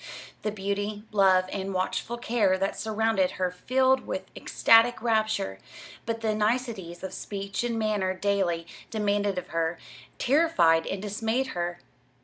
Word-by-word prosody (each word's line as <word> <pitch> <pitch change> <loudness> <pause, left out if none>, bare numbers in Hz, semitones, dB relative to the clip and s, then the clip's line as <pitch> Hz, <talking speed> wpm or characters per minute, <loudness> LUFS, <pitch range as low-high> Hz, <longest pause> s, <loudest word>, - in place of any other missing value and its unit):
The 215 - -1
beauty, 205 +1 -3
love, 190 -3 +4
and 195 -1 -3
watchful 190 +5 -2
care 220 -5 +2
that 195 +1 -1
surrounded 220 -3 0
her 185 -1 0
filled 260 +7 +2
her - - -16
with - - -3
ecstatic 230 +2 +4
rapture; 220 - 0 0.5
but 230 0 -2
the 220 -1 +1
niceties 210 -5 -1
of 190 -1 -5
speech 200 +1 -4
and 235 -1 -1
manner 210 -4 0
daily 185 -4 0 0.2
demanded 205 -2 0
of 180 - -4
her, 165 0 -1 0.4
terrified 245 - +3
and 195 0 -4
dismayed 225 +5 -1
her. 175 0 -3
205 Hz, 140 wpm, -27 LUFS, 185-225 Hz, 0.5 s, love